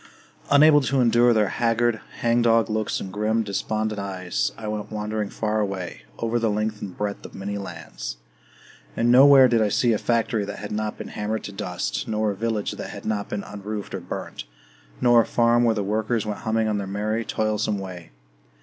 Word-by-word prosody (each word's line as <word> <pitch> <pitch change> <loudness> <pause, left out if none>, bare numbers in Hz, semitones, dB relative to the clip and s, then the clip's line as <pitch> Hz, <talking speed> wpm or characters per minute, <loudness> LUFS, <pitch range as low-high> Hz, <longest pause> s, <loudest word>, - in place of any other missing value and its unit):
Unable 145 +1 +7
to 135 0 0
endure 120 0 +5
their 105 -3 +3
haggard, 115 -1 +1 0.2
hangdog 115 -1 +3
looks 110 -1 -1
and 95 - -7
grim, 110 +2 +1
despondent 110 +1 -2
eyes, 95 -2 -2
I 110 - -6
went 105 0 -4
wandering 105 -1 -3
far 110 0 -1
away, 95 - -4
over 115 +1 0
the 115 -1 +1
length 105 0 -2
and 95 -3 -7
breadth 105 -1 -3
of - - -11
many 100 +1 -4
lands. 80 -10 -7 0.8
And 120 +1 +3
nowhere 135 +1 +8
did 115 -2 +2
I 105 - +2
see 120 +3 +2
a 105 - 0
factory 115 -2 0
that 100 0 -6
had 105 0 -7
not 105 0 -2
been - - -7
hammered 110 +1 -3
to - - -6
dust, 95 -3 -3
nor 110 -1 0
a - - -5
village 110 0 -1
that - - -6
had - - -9
not 105 -2 -2
been 105 - -3
unroofed 105 0 -6
or - - -2
burnt, - - -6 0.5
nor 120 -1 +6
a - - -2
farm 120 0 +3
where 115 -1 +3
the 105 - -1
workers 110 +3 -1
went 105 -1 -4
humming 110 -1 0
on 105 -1 0
their 100 - -4
merry, 105 +3 -1
toilsome 110 -1 -1
way. 90 -3 -8
110 Hz, 195 wpm, -24 LUFS, 100-115 Hz, 0.8 s, nowhere